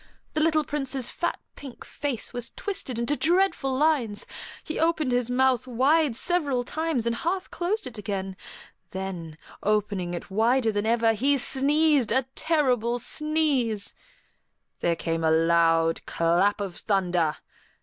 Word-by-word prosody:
The 310 - 0
little 310 -1 +3
Prince's 270 -3 -3
fat, 345 - -2 0.2
pink 270 -4 -10
face 280 -6 -4
was 245 -1 -4
twisted 380 - -4
into 235 +5 0
dreadful 325 -6 +1
lines; 265 -9 +1 0.4
he 315 - -4
opened 320 -4 +1
his 245 -1 0
mouth 255 -1 +2
wide 270 +3 +2
several 285 -4 +1
times 310 -3 -2
and 235 0 0
half 370 +6 -2
closed 390 +6 -2
it 245 -4 -8
again; 195 -2 -4 0.6
then, 180 -5 -5 0.2
opening 200 -4 0
it 175 - -8
wider 225 +3 +2
than 205 +1 -1
ever, 230 -1 +3
he 275 +6 +2
sneezed 280 -1 +3
a 260 +2 +2
terrible 255 -7 +1
sneeze. 270 -6 0 0.9
There 170 -1 +1
came 165 0 -2
a 160 - +3
loud 165 0 +3
clap 175 +5 +2
of 190 -3 -5
thunder. 180 -6 0
245 Hz, 140 wpm, -26 LUFS, 200-295 Hz, 0.9 s, little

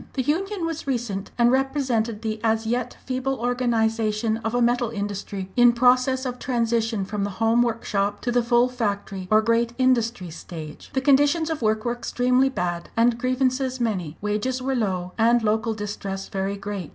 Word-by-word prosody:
The 260 - -1
union 370 - -1
was 325 -3 -4
recent, 230 -7 -2
and 240 0 +4
represented 255 -5 0
the 220 -1 -2
as 225 0 +1
yet 245 +2 -2
feeble 260 +1 -1
organisation 225 -2 0
of 225 +1 -3
a - - +2
metal 240 0 +2
industry 200 -2 -5
in 240 -1 +6
process 255 +2 +3
of 250 -1 -4
transition 230 -4 0
from 205 0 -3
the 200 - -1
home 225 +1 +3
workshop 205 -4 -1
to 245 - -1
the 245 0 +3
full 240 +1 +3
factory, 200 -6 -3
or 215 0 +4
Great 230 +1 +1
Industry 235 -8 +1
stage. 155 -2 -9
The 265 - +1
conditions 290 +4 +3
of 315 - -3
work 215 0 +1
were 240 - +1
extremely 250 +2 +1
bad, 175 -8 -3
and 235 0 +3
grievances 255 +1 0
many; 185 -10 -2
wages 215 +5 -1
were 265 +1 -1
low, 185 -6 -1
and 235 +1 +4
local 220 +1 +1
distress 200 -2 -5
very 195 +1 -2
great. 200 -3 -5
230 Hz, 175 wpm, -24 LUFS, 210-255 Hz, -, in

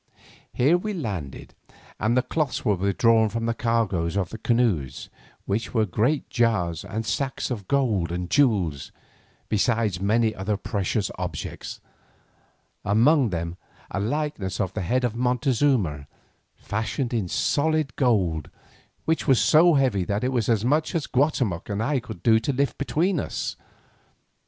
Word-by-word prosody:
Here 150 +8 +3
we 210 +3 -3
landed, 95 - -5 0.5
and 115 +4 +1
the 125 - +3
cloths 145 +1 -2
were 105 - +3
withdrawn 110 +4 +3
from 115 +2 -3
the 115 - +1
cargoes 105 -7 0
of 95 -3 -1
the 115 - -8
canoes, 105 - 0 0.3
which 110 +5 -2
were 110 -1 +3
great 115 - 0
jars 95 -9 0
and 105 +3 -4
sacks 135 +4 -2
of 105 -6 -4
gold 110 - +1
and 90 0 -3
jewels, 95 - +1 0.6
besides 110 -3 +1
many 110 +2 +2
other 100 +2 -2
precious 100 -1 -2
objects, - - -5 1.0
among 120 +6 +4
them 85 -1 -4 0.3
a - - -2
likeness 110 -5 -2
of 95 -3 -1
the 105 - -3
head 125 +8 0
of 120 -2 -1
Montezuma, 125 - +1 0.5
fashioned 115 +4 -3
in 110 -6 0
solid 155 - 0
gold, 95 - +1 0.6
which 160 -1 0
was 130 -5 +5
so 165 +6 +5
heavy 125 -9 +2
that 100 +3 -1
it 130 - +1
was 120 -4 0
as 110 -1 +2
much 155 +6 +1
as 160 - 0
Guatemoc 125 - 0
and 105 +2 -1
I 140 +2 +1
could 125 - -10
do 110 -2 +5
to 115 - -1
lift 140 +1 +1
it - - -43
between 165 +5 +1
us. - - -3
115 Hz, 150 wpm, -25 LUFS, 100-130 Hz, 1.0 s, was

